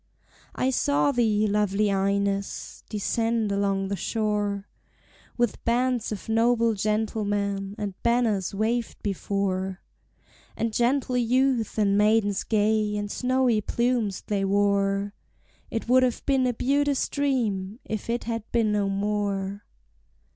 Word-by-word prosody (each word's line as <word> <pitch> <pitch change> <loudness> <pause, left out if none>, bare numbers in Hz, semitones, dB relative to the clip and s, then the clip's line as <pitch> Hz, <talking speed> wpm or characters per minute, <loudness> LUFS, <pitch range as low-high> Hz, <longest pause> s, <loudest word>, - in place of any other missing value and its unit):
I 260 - +1
saw 285 +2 +2
thee, 220 -4 +2
lovely 210 0 +1
Ines, 200 0 -1
descend 225 +1 0
along 195 -1 0
the 200 - -1
shore, 210 -2 -1 0.7
With 240 -2 0
bands 245 -1 +1
of 210 - -6
noble 230 +1 +3
gentlemen, 205 -1 -1
and 205 -3 -3
banners 235 -6 +1
waved 225 +3 -2
before; 190 -1 -2 0.8
And 225 -1 -1
gentle 250 +2 +1
youth 245 -1 +1
and 200 -1 +3
maidens 210 -1 +2
gay, 215 -1 +1
and 205 0 -3
snowy 250 -3 +1
plumes 235 -3 0
they 200 -2 -1
wore; 200 0 +1 0.6
It 225 - -4
would 255 +2 +5
have 250 -2 0
been 265 -2 +2
a 245 - 0
beauteous 280 +2 +1
dream 230 -8 -1
if 215 +1 -5
it 235 +1 -1
had 230 -1 -3
been 225 -3 +2
no 205 -1 +1
more! 200 0 -2
215 Hz, 125 wpm, -26 LUFS, 200-235 Hz, 0.8 s, would